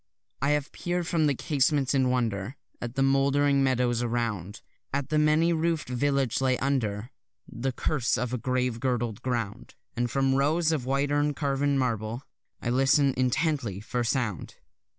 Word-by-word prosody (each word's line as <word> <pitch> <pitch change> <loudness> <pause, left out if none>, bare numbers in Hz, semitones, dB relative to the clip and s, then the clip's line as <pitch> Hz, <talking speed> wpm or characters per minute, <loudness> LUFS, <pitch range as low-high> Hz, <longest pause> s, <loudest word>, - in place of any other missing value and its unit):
I 140 - +2
have 145 -1 -7
peer'd 175 0 -2
from 160 -2 +1
the 140 - +1
casement 140 0 +1
in 130 -2 +2
wonder 115 -2 -1 0.3
At 120 +1 -5
the 135 - +2
mouldering 140 +1 +3
meadows 125 -2 +1
around, 115 -5 -3 0.3
At 140 -1 -2
the 155 - +2
many 155 +3 +3
roof'd 165 -3 -1
village 135 0 0
laid 130 -1 +2
under 120 -5 -1 0.4
The 130 +3 -3
curse 125 -1 0
of 125 +2 -2
a 125 - -1
grave 125 0 -1
girdled 120 -4 -1
ground; 120 -5 -3 0.2
And 120 0 0
from 135 +2 +1
rows 155 +5 +2
of 140 -6 -2
white 140 +2 +1
urn 145 0 +1
carven 140 -1 0
marble 120 -1 -2 0.4
I 120 - 0
listen 135 +2 +3
intently 130 - 0
for 120 +3 -2
sound. 115 -5 -2
130 Hz, 160 wpm, -27 LUFS, 120-145 Hz, 0.4 s, mouldering